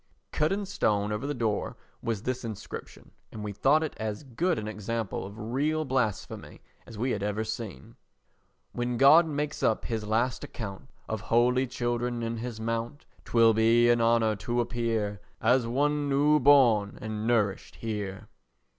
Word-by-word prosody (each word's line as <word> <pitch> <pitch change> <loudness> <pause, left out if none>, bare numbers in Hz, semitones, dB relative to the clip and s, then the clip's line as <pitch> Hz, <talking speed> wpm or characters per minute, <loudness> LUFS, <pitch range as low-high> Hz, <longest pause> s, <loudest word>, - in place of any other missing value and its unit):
Cut 155 +1 +1
in 200 +1 -1
stone 105 - 0
over 105 +6 -3
the 145 - -1
door 110 -4 -2 0.2
was 110 -3 -3
this 130 0 -2
inscription, 110 -4 -8 0.2
and 110 - -7
we 105 - -4
thought 145 +9 +3
it 155 - -3
as 110 +2 -4
good 160 +6 -1
an 105 - -4
example 110 -1 -3
of 100 +2 -11
real 140 +8 -1
blasphemy 125 -7 -2 0.3
as 110 - -10
we 125 +4 0
had 105 - -2
ever 105 +2 -1
seen: 110 - -7 0.8
When 120 0 -2
God 155 +6 +7
makes 150 -1 -3
up 110 - +1
his 110 -2 -2
last 115 +4 0
account 100 +3 -7 0.2
Of 110 -1 -3
holy 125 +4 +2
children 120 -1 -2
in 115 0 -2
his 115 -1 -5
mount, 115 +4 -3 0.2
'Twill 115 -1 +5
be 115 +2 +4
an 120 -1 +2
honour 115 -1 +3
to 120 +5 -2
appear 115 -4 -1 0.2
As 120 +1 +3
one 145 +4 0
new 145 +2 +4
born 120 -7 +5
and 110 0 -4
nourished 105 -5 0
here. 105 -4 -5
115 Hz, 165 wpm, -28 LUFS, 110-130 Hz, 0.8 s, God